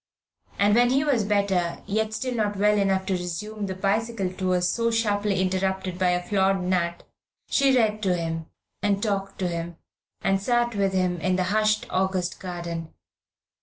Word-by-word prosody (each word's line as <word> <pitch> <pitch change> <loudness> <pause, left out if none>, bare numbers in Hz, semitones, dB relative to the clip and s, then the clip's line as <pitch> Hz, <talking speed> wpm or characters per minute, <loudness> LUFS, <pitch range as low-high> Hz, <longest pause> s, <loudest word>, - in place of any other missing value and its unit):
And 205 +1 +4
when 240 +2 +5
he 270 +3 +2
was 275 -8 +2
better, 200 -4 0
yet 215 +2 -1
still 255 +1 -2
not 210 -3 -1
well 210 +1 +4
enough 195 -2 +1
to 190 - -1
resume 195 +4 -4
the 190 - -4
bicycle 200 0 -1
tour 185 -1 0
so 230 +6 +1
sharply 210 -3 +1
interrupted 190 -1 -1
by 185 -1 +3
a 180 0 +1
flawed 195 -2 +2
nut, 175 -2 -1 0.5
she 275 -2 +4
read 215 -2 +2
to 185 -3 +2
him, 165 -1 -3 0.3
and 205 -1 +1
talked 200 -3 -2
to 185 - -1
him, 170 -1 -4 0.5
and 195 0 +2
sat 240 +2 +1
with 195 -2 0
him 180 -2 0
in 185 +3 +1
the 185 - +1
hushed 215 0 +2
August 185 -1 -1
garden. 170 -3 -5
195 Hz, 170 wpm, -25 LUFS, 180-215 Hz, 0.5 s, when